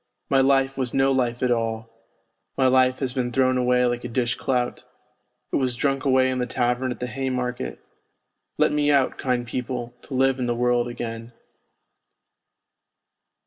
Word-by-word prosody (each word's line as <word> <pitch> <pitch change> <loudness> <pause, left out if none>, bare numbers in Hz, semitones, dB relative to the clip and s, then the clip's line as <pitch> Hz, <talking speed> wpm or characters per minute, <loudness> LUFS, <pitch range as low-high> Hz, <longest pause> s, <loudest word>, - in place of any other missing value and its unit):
My 135 -1 +5
life 135 0 +2
was 125 -2 -2
no 135 0 +3
life 125 -2 0
at 125 - +2
all; 115 -1 -1 0.7
my 130 - +3
life 130 0 +4
has 130 -3 -3
been 125 -2 -1
thrown 130 0 +2
away 125 0 +2
like 120 0 -1
a - - -3
dish 120 0 0
clout; 125 -2 -2 0.7
it - - +3
was 130 -3 0
drunk 135 +2 -1
away 130 -1 +3
in 130 - -2
the 125 - -1
tavern 125 +1 0
at - - -6
the 125 - -2
Haymarket; 125 -1 -3 0.8
let - - +3
me 150 0 +1
out, 140 -2 +2
kind 125 -2 -1
people, 120 0 -4
to 135 - -7
live 135 0 +2
in 125 - -1
the 120 - 0
world 120 0 +1
again.' 115 -1 -6
125 Hz, 170 wpm, -24 LUFS, 120-130 Hz, 0.8 s, My